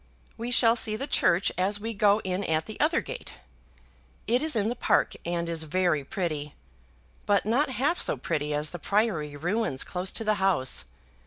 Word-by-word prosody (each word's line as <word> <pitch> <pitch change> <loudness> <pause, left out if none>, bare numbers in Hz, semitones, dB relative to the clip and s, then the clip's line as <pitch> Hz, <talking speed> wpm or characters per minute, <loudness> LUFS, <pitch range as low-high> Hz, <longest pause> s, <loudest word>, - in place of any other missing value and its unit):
We 235 +2 -5
shall 235 -1 +5
see 215 -2 +1
the 270 - -3
church 190 -9 +2
as 200 +3 +1
we 225 +2 -4
go 210 0 +3
in 185 +1 -2
at 160 0 0
the - - -9
other - - +2
gate. - - -8 0.9
It 245 +4 +2
is 310 -3 -1
in 210 -2 +1
the 240 - -2
park, - - +2
and 170 0 -1
is 165 -1 -1
very 175 -2 +1
pretty, 155 -4 -4 0.7
but 205 -1 +3
not 255 +7 +2
half 280 +7 0
so - - +2
pretty 150 -3 -2
as 150 0 -1
the 175 - -7
priory 185 -8 0
ruins 175 -1 -1
close 180 +1 -3
to 225 - -3
the 215 -1 +2
house. 175 -10 +2
195 Hz, 185 wpm, -27 LUFS, 160-225 Hz, 0.9 s, shall